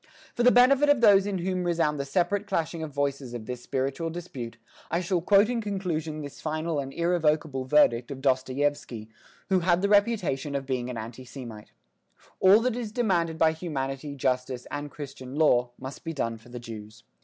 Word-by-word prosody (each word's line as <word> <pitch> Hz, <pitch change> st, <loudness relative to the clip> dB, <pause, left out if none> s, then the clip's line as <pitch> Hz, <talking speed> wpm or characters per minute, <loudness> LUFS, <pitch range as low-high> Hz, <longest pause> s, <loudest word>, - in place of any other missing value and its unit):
For -, -, -2 dB
the 245 Hz, -, +7 dB
benefit 270 Hz, +4 st, +5 dB
of 290 Hz, -3 st, +5 dB
those 205 Hz, -3 st, +6 dB
in 200 Hz, -2 st, -1 dB
whom 185 Hz, +1 st, -1 dB
resound 165 Hz, -4 st, +1 dB
the 140 Hz, -, -2 dB
separate 185 Hz, +7 st, 0 dB
clashing 165 Hz, -4 st, -2 dB
voices 140 Hz, -3 st, -3 dB
of 115 Hz, -2 st, -6 dB
this 125 Hz, 0 st, -6 dB
spiritual 135 Hz, +6 st, -2 dB
dispute, 135 Hz, -9 st, -7 dB, 0.3 s
I 170 Hz, -, 0 dB
shall 180 Hz, -1 st, 0 dB
quote 200 Hz, +4 st, +5 dB
in 240 Hz, -1 st, -1 dB
conclusion 170 Hz, -7 st, -3 dB
this 145 Hz, -, -9 dB
final 155 Hz, 0 st, -2 dB
and 135 Hz, -1 st, -4 dB
irrevocable 155 Hz, -5 st, 0 dB
verdict 125 Hz, -4 st, +3 dB
of 140 Hz, -2 st, -6 dB
Dostoyevsky, 130 Hz, -3 st, -1 dB, 0.4 s
who 190 Hz, -1 st, +4 dB
had 175 Hz, +1 st, +2 dB
the 200 Hz, -, +2 dB
reputation 200 Hz, -, +2 dB
of 135 Hz, -1 st, -2 dB
being 125 Hz, -2 st, -2 dB
an 125 Hz, -, -5 dB
anti 115 Hz, +3 st, -7 dB
Semite: 120 Hz, -5 st, -10 dB, 0.7 s
"All 195 Hz, +4 st, +7 dB
that 250 Hz, -1 st, 0 dB
is 235 Hz, -3 st, -4 dB
demanded 175 Hz, -9 st, 0 dB
by 160 Hz, 0 st, +4 dB
humanity, 140 Hz, -3 st, -4 dB
justice 125 Hz, -1 st, -1 dB
and 145 Hz, 0 st, -4 dB
Christian 135 Hz, -3 st, -8 dB
law, 125 Hz, -6 st, +3 dB
must 130 Hz, +1 st, -8 dB
be 165 Hz, -, -4 dB
done 115 Hz, -6 st, -2 dB
for 115 Hz, -, -18 dB
the 125 Hz, -, -8 dB
Jews. 110 Hz, 0 st, -10 dB
150 Hz, 185 wpm, -27 LUFS, 130-180 Hz, 0.7 s, the